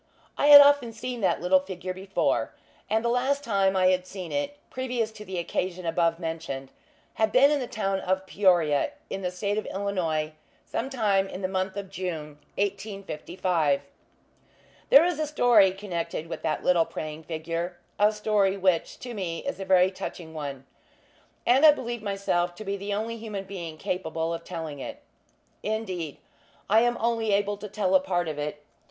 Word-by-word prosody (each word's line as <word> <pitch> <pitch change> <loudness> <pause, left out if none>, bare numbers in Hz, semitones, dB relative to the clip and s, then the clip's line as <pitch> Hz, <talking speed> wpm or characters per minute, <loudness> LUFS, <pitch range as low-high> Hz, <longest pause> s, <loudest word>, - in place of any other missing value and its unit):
I 285 - +2
had 290 -1 +12
often 285 -5 +4
seen 245 +1 -5
that 190 - +1
little 185 +1 +5
figure 185 -1 -6
before; 190 +1 -1 0.3
and 220 +2 +1
the - - +2
last 265 +4 +1
time 195 -5 +2
I 185 -1 +4
had 185 0 +1
seen 185 -3 -7
it, 285 0 -2
previous 245 -3 -2
to 215 -1 -10
the 190 -3 -6
occasion 180 +1 -2
above 165 0 +1
mentioned, 160 -6 -5 0.4
had 220 -1 +1
been 275 +3 +6
at 295 - +2
the 250 - -3
town 195 -4 -1
of 190 0 -1
Peoria, 180 - +2 0.2
in 195 - -3
the 180 - -1
State 200 +4 -1
of - - -7
Illinois, 175 -6 -1 0.3
sometime 215 -7 0
in 190 0 -7
the - - +2
month 190 +1 -2
of 195 -1 -6
June, 160 -6 -5 0.2
1855. 185 -6 -1 1.1
There 285 +5 +8
is 350 -3 -1
a 310 - 0
story 240 -9 +5
connected 180 -5 -4
with 165 - -6
that 160 - -1
little 175 -2 +4
praying 155 0 -6
figure; 165 +2 -4 0.2
a 210 +1 +5
story, 210 -2 +1
which, 185 -3 +1
to 245 -1 -6
me, 180 -3 -4
is 280 -7 -3
a 195 - -4
very 185 0 +4
touching 170 -3 -7
one; 140 -4 -6 0.8
and 260 +4 +4
I 310 - +11
believe 240 -5 0
myself 195 -4 -1
to 215 - -9
be 200 0 -1
the 200 +1 -5
only 220 +3 -2
human 215 -3 -5
being 175 -5 -7
capable 165 -2 -2
of 165 0 -5
telling 160 -5 -6
it. - - -7 0.6
Indeed, 190 -8 -3 0.5
I 220 - +7
am 240 0 +2
only 225 -2 0
able 205 +1 +1
to 210 - -7
tell 215 +7 -1
a 285 - +7
part 175 - -1
of 150 -2 -4
it. 150 0 -4
195 Hz, 180 wpm, -27 LUFS, 175-220 Hz, 1.1 s, had